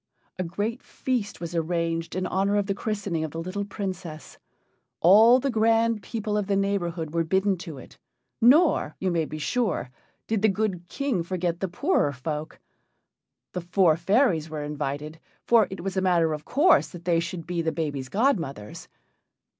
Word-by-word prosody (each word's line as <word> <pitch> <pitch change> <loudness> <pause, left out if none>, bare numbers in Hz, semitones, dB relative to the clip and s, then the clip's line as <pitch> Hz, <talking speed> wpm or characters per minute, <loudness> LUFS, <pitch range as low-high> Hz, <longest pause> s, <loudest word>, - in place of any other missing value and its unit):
A - - +1
great 205 +7 -3
feast 235 -6 -3
was 170 0 -6
arranged 165 0 -1
in 185 0 -1
honor 195 +2 +1
of 205 -1 +1
the 195 - -1
christening 195 -6 -3
of 160 - -3
the 165 - -6
little 185 +4 -3
Princess. 185 -6 -6 0.6
All 220 +8 +7
the 275 +1 -1
grand 225 0 +2
people 210 +1 -3
of 200 - -3
the 200 - +1
neighborhood 175 -5 -1
were 170 0 +1
bidden 190 +4 +1
to 165 -5 -8
it, 130 - -13 0.4
nor, 275 - +4
you 190 -1 0
may 165 -2 +1
be 155 - -7
sure, 185 - -1 0.3
did 220 -3 -1
the 215 - +4
good 190 -3 -2
King 270 -4 -1
forget 175 -1 -2
the 190 - -1
poorer 195 - +1
folk. 150 +4 -5 1.0
The 180 - -3
four 175 -1 +3
fairies 170 - +2
were 155 -1 -4
invited, 150 +1 -4 0.3
for 230 -3 +5
it 190 - -7
was 195 0 -3
a 190 - +1
matter 170 -4 +2
of 150 -1 -6
course 320 +6 +4
that 175 -2 -11
they 170 -2 +3
should 170 0 -5
be 175 -1 -2
the 160 -1 0
baby's 145 -5 -3
godmothers. 165 - -1
180 Hz, 175 wpm, -26 LUFS, 165-210 Hz, 1.0 s, All